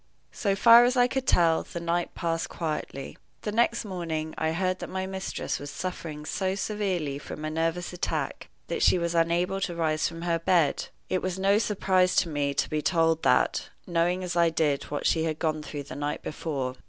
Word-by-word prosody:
So 200 -3 0
far 230 +4 +8
as 250 +1 +2
I 245 - +6
could 260 0 -3
tell, 165 -2 +4
the 170 - -7
night 170 +1 -1
passed 165 0 -2
quietly. 150 -4 -4 0.2
The 210 - -2
next 230 +1 +1
morning 165 -5 -3
I 160 - 0
heard 185 +2 -1
that - - -6
my 190 0 -3
mistress 190 0 -3
was 145 - -7
suffering 160 -2 -5
so 190 +4 -1
severely 190 -9 -2
from 150 +1 -7
a 155 - -2
nervous 165 +3 -1
attack 180 - -3 0.2
that - - -3
she - - +5
was 170 -1 -1
unable 170 +3 +1
to 175 - -2
rise 155 -2 +1
from 165 0 -7
her 170 -1 +1
bed. 165 -3 +2 0.2
It 185 - 0
was 185 0 -2
no 195 +2 +3
surprise 185 -4 +2
to 170 - +3
me 145 -2 -1
to - - +1
be 155 -1 -1
told 165 -1 +2
that, 125 - +2 0.2
knowing 175 +1 +1
as 180 -1 -3
I 170 -1 +4
did 150 -3 0
what 145 - -4
she 160 -1 +2
had 155 -1 -2
gone 155 -1 -1
through 150 -1 -6
the 140 - -9
night 145 +1 -3
before. 140 -5 -3
170 Hz, 205 wpm, -27 LUFS, 155-185 Hz, 0.2 s, far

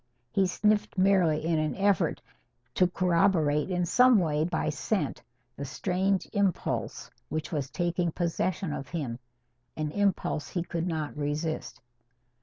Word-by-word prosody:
He 190 +5 +2
sniffed 210 +2 +1
merely 180 -5 +3
in 165 -1 +2
an 155 0 -1
effort 200 0 +1 0.5
to 180 - +4
corroborate 170 -4 +2
in 180 -1 0
some 250 +6 +5
way 155 -5 +1
by 160 -2 -1
scent 150 +1 -2 0.3
the 140 - -6
strange 185 +7 0
impulse 200 -3 -1 0.2
which 155 0 -3
was 145 -5 -2
taking 175 +1 -1
possession 175 0 -1
of 135 - -5
him 135 -8 -4 0.6
an 155 -1 -2
impulse 195 -6 0
he 175 - -2
could 170 0 -3
not 155 -3 -3
resist. 150 +2 -3
170 Hz, 135 wpm, -28 LUFS, 155-190 Hz, 0.6 s, some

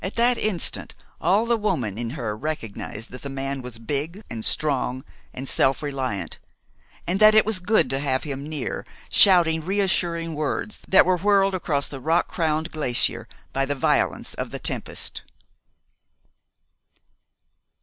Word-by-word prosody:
At 190 - -4
that 240 +1 +3
instant 205 -5 +1 0.3
all 195 +7 +3
the 235 0 +2
woman 150 - -1
in 120 -1 -2
her 110 -5 -3
recognized 115 -4 -5
that 125 - -9
the 140 - -6
man 135 0 -4
was 125 -2 -8
big, 150 - -3
and 115 -1 -4
strong, 130 -3 0 0.3
and 130 +2 -7
self 135 +3 +2
reliant, 130 - -3 0.7
and 185 +3 -1
that 215 0 +7
it 215 - +6
was 215 -3 +1
good 210 +5 +3
to 135 - 0
have 130 -2 0
him 140 0 -5
near, 150 -4 -4 0.3
shouting 165 -4 +5
reassuring 175 -3 0
words 155 +7 -3
that 190 - +6
were 185 0 +3
whirled 195 +1 +3
across 150 -6 0
the 135 - -8
rock 160 +6 +1
crowned 160 -1 -1
glacier 140 -6 0 0.3
by 135 - +1
the 145 +1 -1
violence 135 - 0
of - - -4
the - - -5
tempest. - - -1
155 Hz, 150 wpm, -24 LUFS, 135-185 Hz, 0.7 s, that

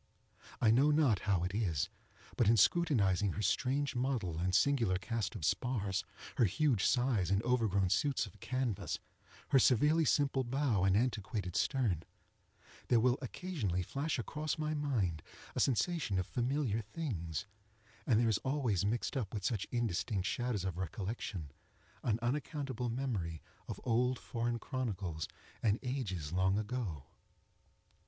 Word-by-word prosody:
I 110 - +5
know 135 +6 +5
not 145 - +4
how 90 -4 +3
it 90 +1 -2
is, 90 -10 0 0.5
but 115 -4 +3
in 115 - +5
scrutinizing 105 - +3
her 105 - -3
strange 135 +7 +1
model 120 -10 -1
and 90 +1 +1
singular 115 -6 +3
cast 110 0 -3
of 75 - -3
spars, 100 -4 0 0.3
her 120 - +5
huge 115 - +2
size 120 -8 +2
and 100 0 +3
overgrown 110 -7 +2
suits 140 -4 +2
of 100 - -14
canvas, 130 -6 -2 0.5
her 135 - +6
severely 150 +7 +4
simple 140 -2 +2
bow 125 -6 +1
and 95 +1 +4
antiquated 105 -5 -1
stern, 115 - +1 0.9
there 120 - +4
will 125 +2 +3
occasionally 125 - -2
flash 140 - -2
across 150 +6 -3
my 155 0 -1
mind 115 - 0 0.3
a - - -1
sensation 140 - +1
of 90 - 0
familiar 125 - 0
things, 105 - -4 0.6
and 110 -3 +4
there 120 - +3
is 110 -4 +2
always 130 - 0
mixed 115 +8 -1
up 115 -8 -2
with 100 - -3
such 110 -6 -1
indistinct 110 -4 -1
shadows 120 -3 -1
of 90 -2 -3
recollection, 95 - -4 0.5
an 110 -3 +1
unaccountable 130 -1 -2
memory 110 - -2 0.3
of - - -5
old 125 +1 +2
foreign 120 -1 -2
chronicles 100 - -3 0.3
and 105 -1 +3
ages 95 - -3
long 95 +2 +2
ago. 105 - -3
115 Hz, 145 wpm, -34 LUFS, 95-130 Hz, 0.9 s, her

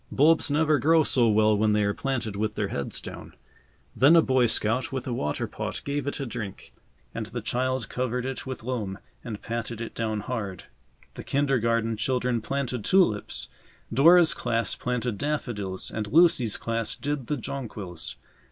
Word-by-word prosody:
Bulbs 155 +3 +4
never 150 0 +3
grow 160 +4 +4
so 120 -5 +3
well 110 0 +4
when 105 +1 +2
they 105 0 +2
are 100 0 +1
planted 115 -6 -3
with 105 +1 -2
their 100 -2 -1
heads 70 - -3
down. - - -9 0.6
Then 145 +6 +6
a 165 - +8
Boy 130 -2 +3
Scout 115 +3 0
with 130 -2 -3
a 125 - -2
water 75 -10 -2
pot - - -4
gave 145 -1 -2
it 140 - -3
a 140 - -2
drink, 110 -5 -7 0.4
and - - -4
the - - -5
child 130 -2 -1
covered 125 0 -2
it 130 0 -4
with 130 -4 -6
loam 110 -6 -3 0.3
and 110 -4 -7
patted 115 -1 -4
it 115 - -5
down 110 -2 -2
hard. 100 -6 -4 0.5
The - - -8
kindergarten 115 -5 +1
children 125 0 0
planted 130 -2 -3
tulips. 145 - +2 0.5
Dora's 165 +6 +7
class 115 0 0
planted 125 -3 -2
daffodils 115 -11 -3
and 110 -1 -3
Lucy's 150 -9 +5
class 115 -1 -2
did 145 -4 -3
the 150 - -1
jonquils. 110 - -5
120 Hz, 170 wpm, -26 LUFS, 110-135 Hz, 0.6 s, a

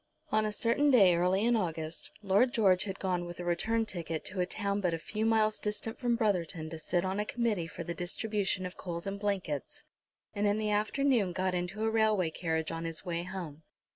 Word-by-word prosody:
On 215 0 +3
a - - -2
certain 235 +7 +2
day 200 -9 +7
early 180 +4 +2
in 240 0 +4
August 165 -5 -3
Lord 205 +6 +3
George 190 -5 +4
had 195 -1 -4
gone 180 -2 -1
with 175 0 -8
a 175 - -4
return 225 +7 +1
ticket 165 -5 -4
to 190 0 -4
a 180 - +1
town 200 0 -1
but 175 -3 +1
a - - -3
few 215 +6 -2
miles 215 -1 +3
distant 210 +1 -3
from 245 -2 +2
Brotherton 180 -7 -1
to 165 - -6
sit 175 +3 0
on 190 +2 -1
a - - +2
committee 210 -6 -1
for 170 +2 -7
the 170 - -4
distribution 190 +2 -1
of 180 - -6
coals 170 -2 -5
and 200 0 -3
blankets, 190 - -2 0.5
and 205 0 +1
in 205 +1 +2
the 215 -1 0
afternoon 215 -1 +2
got 185 +1 0
into 180 +4 -2
a 220 - +2
railway 215 -6 +2
carriage 160 -1 -1
on 165 0 -4
his 165 +2 -5
way 170 -1 -1
home. 175 -4 -6
190 Hz, 215 wpm, -31 LUFS, 175-215 Hz, 0.5 s, day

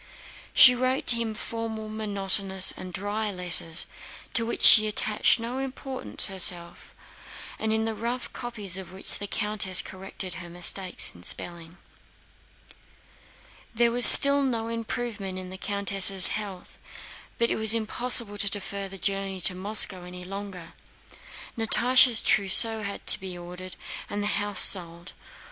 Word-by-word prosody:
She 250 - +7
wrote 255 +2 -3
to 240 - +7
him 230 -2 -5
formal, 225 -1 -7
monotonous, 195 -3 0
and 185 0 -10
dry 205 +3 -5
letters, 175 -3 -1 0.5
to 230 -1 +2
which - - -5
she 215 -1 +8
attached 215 +2 0
no 240 +3 -6
importance 270 0 -3
herself, 175 -3 0 0.6
and 220 0 -3
in 220 0 -1
the 225 - -4
rough 235 +3 -6
copies 210 -7 -2
of 190 -2 -11
which 190 +1 -7
the 205 - -7
countess 205 -3 +1
corrected 190 -1 -8
her 175 -1 -11
mistakes 180 +2 -1
in 85 - -18
spelling. 170 - -5 2.0
There 235 +1 +1
was 245 +1 +6
still 280 0 +6
no 230 -4 -4
improvement 230 -4 -7
in 185 0 -8
the 190 - -9
countess' 195 -2 +4
health, 200 -4 -9 0.6
but 235 0 -1
it - - -1
was 220 0 +4
impossible 225 -1 -1
to 200 - +3
defer 200 -1 -5
the 195 - -8
journey 195 0 -5
to 180 - +5
Moscow 190 -1 0
any 180 0 -11
longer. 195 -2 -10 0.8
Natásha's 240 +1 +3
trousseau 220 +3 +3
had 200 -1 -8
to - - +5
be 185 -2 -9
ordered 180 +1 -11 0.3
and 205 0 -5
the 205 0 -2
house 205 0 -3
sold. 170 -2 0
205 Hz, 145 wpm, -24 LUFS, 185-225 Hz, 2.0 s, she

